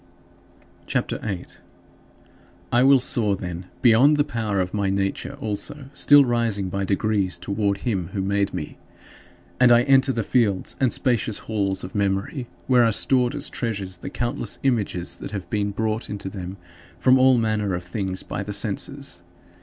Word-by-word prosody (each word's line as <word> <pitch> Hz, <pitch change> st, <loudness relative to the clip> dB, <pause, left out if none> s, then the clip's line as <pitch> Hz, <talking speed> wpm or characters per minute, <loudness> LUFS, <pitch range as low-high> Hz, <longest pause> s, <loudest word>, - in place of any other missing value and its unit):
CHAPTER -, -, -1 dB
VIII 95 Hz, -5 st, -4 dB
12. -, -, -14 dB, 1.1 s
I 120 Hz, -, +4 dB
will 135 Hz, +1 st, +6 dB
soar, 110 Hz, -5 st, +1 dB
then, 90 Hz, -1 st, -6 dB, 0.2 s
beyond 130 Hz, +5 st, +6 dB
this 145 Hz, -, +2 dB
power 110 Hz, -7 st, -2 dB
of 90 Hz, -1 st, -2 dB
my 100 Hz, -2 st, 0 dB
nature 95 Hz, 0 st, -2 dB
also, 130 Hz, +6 st, -4 dB
still 145 Hz, 0 st, +6 dB
rising 115 Hz, -5 st, 0 dB
by 100 Hz, +1 st, -2 dB
degrees 100 Hz, -2 st, 0 dB
toward 100 Hz, +1 st, -2 dB
him 95 Hz, -9 st, -1 dB
who 95 Hz, 0 st, -4 dB
made 100 Hz, +1 st, 0 dB
me. 75 Hz, -, -6 dB, 0.8 s
And 125 Hz, -1 st, +6 dB
I 120 Hz, 0 st, +6 dB
enter 135 Hz, 0 st, +4 dB
the 115 Hz, -3 st, -2 dB
fields 105 Hz, -5 st, +1 dB
and 130 Hz, -3 st, +2 dB
spacious 120 Hz, -4 st, +1 dB
halls 100 Hz, -3 st, -2 dB
of 90 Hz, -, -7 dB
memory, 100 Hz, +6 st, -1 dB, 0.2 s
where 125 Hz, -2 st, +4 dB
are 115 Hz, -, +3 dB
stored 125 Hz, +3 st, +2 dB
as 145 Hz, 0 st, -1 dB
treasures 100 Hz, -6 st, -4 dB
the -, -, -7 dB
countless 120 Hz, 0 st, -1 dB
images 105 Hz, -9 st, 0 dB
that -, -, -7 dB
have 95 Hz, -4 st, -5 dB
been 105 Hz, -1 st, 0 dB
brought 110 Hz, +2 st, -2 dB
into 100 Hz, -2 st, -5 dB
them 95 Hz, -1 st, -7 dB, 0.4 s
from 130 Hz, 0 st, +4 dB
all 130 Hz, -1 st, +5 dB
manner 110 Hz, -4 st, 0 dB
of 90 Hz, -, -5 dB
things 95 Hz, +1 st, -4 dB
by -, -, -5 dB
the 105 Hz, +1 st, -5 dB
senses. 115 Hz, +1 st, -1 dB
105 Hz, 170 wpm, -23 LUFS, 95-120 Hz, 1.1 s, will